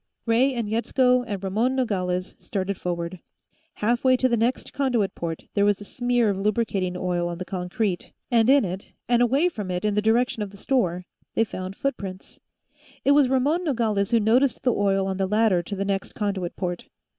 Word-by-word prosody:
Ray 250 +3 +3
and 235 -3 -2
Yetsko 250 +3 +2
and 200 -3 -4
Ramon 220 +7 +1
Nogales 185 -7 -1
started 195 0 -3
forward. 175 0 -4 0.6
Halfway 245 +4 +2
to 255 - +3
the 240 - +2
next 235 +3 -1
conduit 245 -8 0
port, 165 -1 -5
there 200 - +2
was 205 -1 +3
a - - -8
smear 245 +2 +1
of 195 - -3
lubricating 195 -3 0
oil 175 -1 -1
on 170 - -5
the 185 - -5
concrete, 180 +1 -2 0.2
and 230 0 +4
in 275 -4 +5
it, 185 +2 -6
and 240 0 +3
away 270 +8 +3
from 210 - -4
it 180 +2 -2
in 210 - +2
the 210 - +2
direction 225 +1 +2
of 205 - -3
the 200 - -14
store, 180 -7 0 0.3
they 225 - +4
found 185 -3 -6
footprints. 200 -9 -5 0.7
It 280 - +5
was 285 -3 +5
Ramon 285 +7 +2
Nogales 225 - 0
who 235 -1 +4
noticed 240 +4 +2
the 250 - +3
oil 195 -1 +1
on 190 -1 -2
the 190 -1 0
ladder 210 -3 +3
to 200 +4 -6
the 195 0 -2
next 195 -1 -2
conduit 195 -4 -2
port. 175 -2 -4
210 Hz, 195 wpm, -24 LUFS, 190-245 Hz, 0.7 s, in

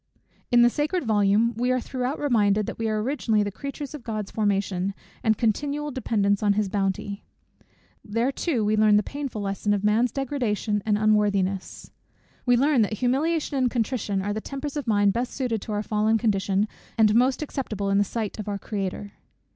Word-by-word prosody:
In 240 0 +6
the 240 - +6
sacred 300 +4 -1
volume 215 +2 +3
we 245 +2 0
are 255 - +2
throughout 255 +3 -3
reminded, 210 -7 +2
that - - -6
we 225 -1 0
are 215 0 0
originally 225 -5 +1
the 205 - -3
creatures 280 +6 -6
of 300 - -7
God's 215 -3 -4
formation, 200 -2 0 0.3
and 220 -1 +3
continual 290 +6 -1
dependents 205 -6 0
on 205 -1 +3
his 205 -1 0
bounty. 200 0 -2 0.8
There 230 +5 0
too 260 -7 -1
we 215 +1 +2
learn 215 -1 +5
the 210 - +4
painful 275 -6 -5
lesson 200 +1 0
of 200 - -3
man's 220 +3 +3
degradation 235 -6 -1
and 210 -1 +3
unworthiness. 205 -3 0 0.6
We 245 0 +5
learn 275 -1 +3
that 215 0 +1
humiliation 280 +6 0
and 255 -2 +2
contrition 225 -5 -1
are 205 +1 -1
the 215 - -3
tempers 275 +3 -5
of 290 -4 -4
mind 205 -2 +3
best 240 +3 -2
suited 240 -6 -1
to 215 - -7
our 210 0 -1
fallen 215 +1 +2
condition, 200 -2 +1 0.3
and 215 -2 +5
most 255 +5 +3
acceptable 215 -9 -3
in 200 - +3
the - - +4
sight 220 0 -4
of 210 - -5
our 200 -1 -2
Creator. 200 0 -4
215 Hz, 185 wpm, -25 LUFS, 205-255 Hz, 0.8 s, In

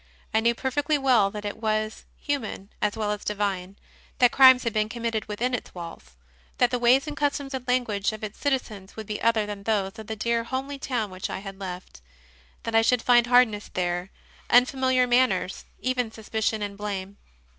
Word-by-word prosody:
I 220 - +4
knew 235 +1 +2
perfectly 290 +4 0
well 250 -8 +4
that 210 +1 -7
it 205 - -4
was 215 -1 -2
human 235 -8 -3
as 210 +1 0
well 210 -1 -1
as 210 0 -4
divine, 195 -2 -2 0.4
that 245 -2 +5
crimes 260 -1 +7
had 230 -3 -1
been 215 0 +1
committed 230 -2 -2
within 235 +5 -2
its 245 - -4
walls; 170 - -9 0.4
that 245 - +3
the 250 - 0
ways 250 +3 +4
and 300 -1 -5
customs 285 -1 -1
and 255 -1 -5
language 235 -6 +1
of 215 0 -9
its 215 -1 -6
citizens 220 -9 -2
would 220 - -7
be 210 0 -5
other 230 -2 +2
than 205 -1 -6
those 200 0 -1
of 220 - -9
the 220 - -4
dear 235 +1 0
homely 270 +3 -4
town 235 -7 -2
which 185 0 -5
I - - -3
had 195 0 -8
left; 180 - -8 0.6
that 230 - -4
I 225 - +6
should 240 +1 +2
find 240 -1 +5
hardness 240 -4 +3
there, 175 0 -2 0.4
unfamiliar 255 +1 +4
manners, 245 -7 +1 0.2
even 250 -3 -1
suspicion 220 -1 -2
and 200 -1 -4
blame. 200 -1 -5
220 Hz, 190 wpm, -26 LUFS, 205-250 Hz, 0.6 s, crimes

